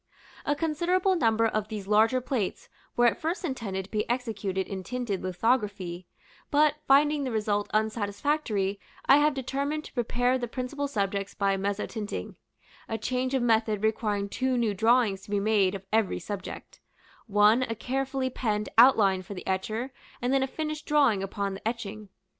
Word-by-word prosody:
A 290 Hz, -, +2 dB
considerable 345 Hz, +5 st, +1 dB
number 230 Hz, -7 st, +2 dB
of 215 Hz, -2 st, 0 dB
these 210 Hz, -3 st, -6 dB
larger 220 Hz, +5 st, +4 dB
plates 245 Hz, -6 st, -3 dB, 0.3 s
were 240 Hz, -, +5 dB
at 240 Hz, +8 st, +2 dB
first 340 Hz, +4 st, -2 dB
intended 205 Hz, -, -3 dB
to -, -, -20 dB
be 210 Hz, 0 st, -1 dB
executed 210 Hz, -6 st, -2 dB
in 195 Hz, -1 st, -5 dB
tinted 235 Hz, -2 st, -3 dB
lithography; 185 Hz, -3 st, -1 dB, 0.4 s
but, 300 Hz, +1 st, +4 dB
finding 290 Hz, +1 st, +4 dB
the 260 Hz, -, -2 dB
result 210 Hz, -2 st, -1 dB
unsatisfactory, 215 Hz, -1 st, 0 dB, 0.3 s
I 275 Hz, -, +7 dB
have 295 Hz, 0 st, +3 dB
determined 280 Hz, +3 st, -2 dB
to -, -, -12 dB
prepare 245 Hz, +1 st, +1 dB
the 240 Hz, -, -3 dB
principal 260 Hz, +4 st, -3 dB
subjects 200 Hz, -5 st, -2 dB
for 200 Hz, -, -2 dB
mezzotinting, 205 Hz, +2 st, -3 dB, 0.6 s
a 225 Hz, -, -1 dB
change 255 Hz, +4 st, -1 dB
of 260 Hz, -, +1 dB
method 220 Hz, -3 st, +2 dB
requiring 210 Hz, -2 st, 0 dB
two 255 Hz, +4 st, -1 dB
new 230 Hz, -3 st, +1 dB
drawings 225 Hz, -2 st, +3 dB
to -, -, -17 dB
be 205 Hz, 0 st, +1 dB
made 200 Hz, -2 st, +2 dB
of 195 Hz, 0 st, -8 dB
every 220 Hz, -3 st, +2 dB
subject; 200 Hz, -3 st, -7 dB, 0.5 s
one 210 Hz, +3 st, +5 dB
a 230 Hz, -3 st, -2 dB
carefully 265 Hz, +2 st, -2 dB
penned 210 Hz, -4 st, -1 dB
outline 205 Hz, -7 st, +6 dB
for 190 Hz, +2 st, -9 dB
the 180 Hz, -, -8 dB
etcher, 215 Hz, +7 st, -2 dB, 0.3 s
and 250 Hz, +2 st, 0 dB
then 270 Hz, -, +3 dB
a 265 Hz, -, +1 dB
finished 305 Hz, +1 st, -5 dB
drawing 275 Hz, -10 st, +3 dB
upon 195 Hz, 0 st, -3 dB
the 195 Hz, +3 st, -5 dB
etching. 215 Hz, -3 st, -5 dB
225 Hz, 165 wpm, -28 LUFS, 205-260 Hz, 0.6 s, I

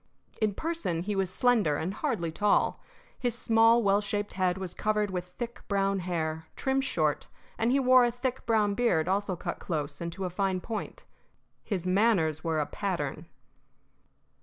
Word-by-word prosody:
In 210 Hz, -2 st, +1 dB
person 320 Hz, -, -2 dB
he 205 Hz, +2 st, -2 dB
was 195 Hz, -2 st, 0 dB
slender 215 Hz, -11 st, +3 dB
and 175 Hz, +6 st, -2 dB
hardly 215 Hz, -, -2 dB
tall. 205 Hz, +6 st, +2 dB, 0.4 s
His 240 Hz, -2 st, -1 dB
small, 230 Hz, 0 st, +4 dB
well 200 Hz, 0 st, +3 dB
shaped 205 Hz, 0 st, -2 dB
head 185 Hz, -1 st, +1 dB
was 185 Hz, -2 st, -5 dB
covered 210 Hz, -1 st, 0 dB
with 180 Hz, -1 st, -3 dB
thick, 240 Hz, -1 st, -5 dB
brown 195 Hz, -1 st, +1 dB
hair, 160 Hz, -3 st, -3 dB
trimmed 270 Hz, 0 st, 0 dB
short, 155 Hz, -, 0 dB, 0.3 s
and 230 Hz, +1 st, +1 dB
he 275 Hz, -, +3 dB
wore 255 Hz, -1 st, +6 dB
a 240 Hz, -, +3 dB
thick, 250 Hz, +2 st, -3 dB
brown 215 Hz, -3 st, +3 dB
beard 200 Hz, -8 st, +2 dB
also 195 Hz, 0 st, 0 dB
cut -, -, -5 dB
close 145 Hz, -3 st, -3 dB
and 170 Hz, 0 st, -3 dB
to 190 Hz, +2 st, -4 dB
a 180 Hz, -, -3 dB
fine 190 Hz, 0 st, 0 dB
point. 220 Hz, +4 st, -6 dB, 0.6 s
His 185 Hz, -5 st, -3 dB
manners 185 Hz, -6 st, +2 dB
were 165 Hz, -2 st, 0 dB
a 150 Hz, -, +1 dB
pattern. 160 Hz, -4 st, -3 dB
195 Hz, 170 wpm, -29 LUFS, 170-230 Hz, 0.6 s, wore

